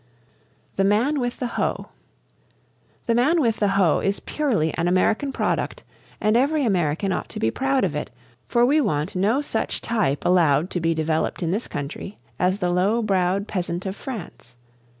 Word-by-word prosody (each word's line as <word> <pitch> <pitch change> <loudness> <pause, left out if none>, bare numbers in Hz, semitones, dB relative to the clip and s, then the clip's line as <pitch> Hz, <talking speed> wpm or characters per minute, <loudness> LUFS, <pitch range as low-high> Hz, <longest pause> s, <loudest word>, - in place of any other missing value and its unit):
THE 195 - +3
MAN 230 +9 +2
WITH 245 -1 -2
THE 250 - -3 0.2
HOE. - - -2 1.2
"The 230 - +2
Man 280 +9 +3
With 230 -6 +1
the 205 - +2
Hoe" 180 -6 +4
is 195 +1 -1
purely 220 - -1
an 170 0 -1
American 215 +9 +2
product, - - -2 0.4
and 215 +1 +2
every 285 +3 +2
American 180 -2 0
ought - - -3
to - - -6
be 110 - +1
proud 270 - 0
of - - 0
it, - - -3 0.4
for 240 0 +3
we 295 +5 +3
want 185 - -1
no 210 +9 +2
such 230 -6 -2
type 215 -12 -1
allowed 170 -2 +3
to 180 - -1
be 165 0 +1
developed 160 +2 -1
in 165 - 0
this 210 +6 -2
country 145 +8 -6 0.2
as 185 +2 +2
the 180 -3 0
low 200 +6 +2
browed 195 0 +1
peasant 175 -1 -3
of 190 0 -3
France. 200 - -8
195 Hz, 175 wpm, -23 LUFS, 175-240 Hz, 1.2 s, Hoe